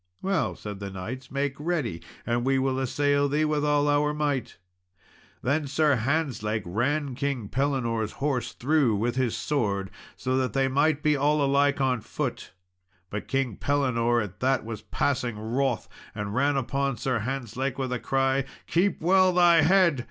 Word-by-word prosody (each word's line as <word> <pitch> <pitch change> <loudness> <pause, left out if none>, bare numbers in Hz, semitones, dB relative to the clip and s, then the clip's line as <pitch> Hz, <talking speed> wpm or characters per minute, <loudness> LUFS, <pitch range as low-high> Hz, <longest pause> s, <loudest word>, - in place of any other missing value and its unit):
"Well," 190 0 0
said 105 -2 -7
the 100 -1 -5
knights, 110 +8 -7
"make 140 0 -1
ready, 150 - -2 0.2
and 120 0 0
we 135 +1 +2
will 130 0 0
assail 145 +2 +1
thee 150 +2 +1
with 150 -1 0
all 145 0 +2
our 145 +1 +2
might." 145 -4 -2 0.9
Then 145 +3 0
Sir 150 +1 +3
Hantzlake 120 -5 -1
ran 135 - -1
King 135 -4 -2
Pellinore's 120 -5 -1
horse 135 -3 -2
through 135 -4 +2
with 120 +4 -1
his 130 -3 0
sword, 100 -9 -1 0.2
so 130 0 -2
that 130 -1 0
they 135 -1 +2
might 145 +2 +1
be 150 -1 +3
all 145 +1 +2
alike 140 +1 +2
on 130 -3 +1
foot. - - -4 0.6
But 105 - -5
King 135 -6 -1
Pellinore 120 -5 +1
at 100 -1 -9
that 130 -2 +1
was 110 -2 -6
passing 120 0 -1
wroth, 120 +3 -1 0.3
and 105 -1 -4
ran 140 +3 +2
upon 135 0 -1
Sir 125 +1 -1
Hantzlake, 130 +2 -3
with 130 -2 -2
a 125 - -2
cry, 135 +1 +1 0.2
"Keep 180 +2 +1
well 185 +2 +4
thy 175 -2 +5
head!" 170 -3 +4
135 Hz, 165 wpm, -26 LUFS, 120-145 Hz, 0.9 s, thy